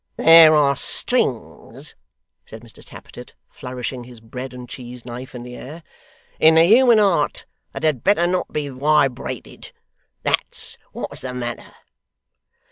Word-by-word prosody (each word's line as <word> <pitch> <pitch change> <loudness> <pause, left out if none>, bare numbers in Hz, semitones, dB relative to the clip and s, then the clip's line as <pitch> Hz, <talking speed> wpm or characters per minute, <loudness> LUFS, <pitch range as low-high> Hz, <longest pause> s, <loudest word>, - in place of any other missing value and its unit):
'There 165 -1 +8
are 140 -2 +3
strings,' - - -2 0.5
said 110 +1 -13
Mr 115 - -13
Tappertit, - - -13
flourishing 125 0 -7
his 120 -1 -14
bread 125 +3 -8
and 125 -1 -10
cheese 125 -1 -10
knife 125 +1 -9
in 120 - -7
the 125 0 -10
air, 155 +7 -10 0.6
'in 160 +1 +6
the 165 - +6
human 235 +5 +5
heart 190 -8 +1 0.3
that - - -7
had 150 -7 0
better 195 -3 +3
not 180 +1 -2
be 150 -1 -3
wibrated. 135 -1 -1 0.5
That's - - -1
what's - - -6
the 125 -1 -6
matter. 120 -1 -6
135 Hz, 135 wpm, -20 LUFS, 125-160 Hz, 0.6 s, There